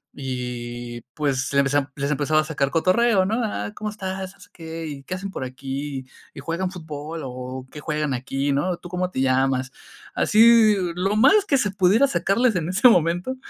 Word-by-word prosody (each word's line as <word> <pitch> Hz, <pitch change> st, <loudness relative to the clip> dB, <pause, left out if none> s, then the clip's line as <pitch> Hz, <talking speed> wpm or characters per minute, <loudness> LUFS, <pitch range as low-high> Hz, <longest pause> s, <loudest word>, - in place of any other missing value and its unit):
Y, 120 Hz, -2 st, -5 dB
pues, 140 Hz, -2 st, -1 dB
les 140 Hz, -, +4 dB
empeza 140 Hz, 0 st, 0 dB
les 140 Hz, +1 st, -2 dB
empezaba 155 Hz, +2 st, +2 dB
a 160 Hz, -, -6 dB
cotorreo, 185 Hz, +5 st, +3 dB
¿no? 205 Hz, -, -1 dB
"Ah, 105 Hz, -, -3 dB
¿cómo 215 Hz, 0 st, -4 dB
estás?, 190 Hz, -2 st, -5 dB
así -, -, -17 dB
qué, 165 Hz, -1 st, -7 dB
¿y 145 Hz, -3 st, -7 dB
qué 185 Hz, -, -4 dB
hacen 195 Hz, +1 st, -6 dB
por 130 Hz, -, -5 dB
aquí?, 135 Hz, +1 st, -5 dB, 0.3 s
¿y -, -, -8 dB
juegan 165 Hz, +6 st, -2 dB
fútbol 160 Hz, -2 st, -7 dB
o 130 Hz, 0 st, -7 dB
qué 150 Hz, -, -9 dB
juegan 150 Hz, -1 st, -2 dB
aquí, 135 Hz, +3 st, -2 dB
no?, 170 Hz, +6 st, 0 dB
¿tú 175 Hz, -, -11 dB
cómo 180 Hz, 0 st, -2 dB
te 130 Hz, -, -3 dB
llamas?". 130 Hz, 0 st, +1 dB, 0.4 s
Así, 225 Hz, -1 st, +5 dB, 0.2 s
lo 195 Hz, +4 st, -1 dB
más 390 Hz, -, +5 dB
que 285 Hz, -8 st, +2 dB
se 205 Hz, -6 st, 0 dB
pudiera 195 Hz, +7 st, +4 dB
sacarles 235 Hz, -3 st, +1 dB
en 165 Hz, -1 st, -1 dB
ese 215 Hz, +7 st, +5 dB
momento, 175 Hz, +5 st, +1 dB
160 Hz, 180 wpm, -23 LUFS, 135-190 Hz, 0.4 s, Así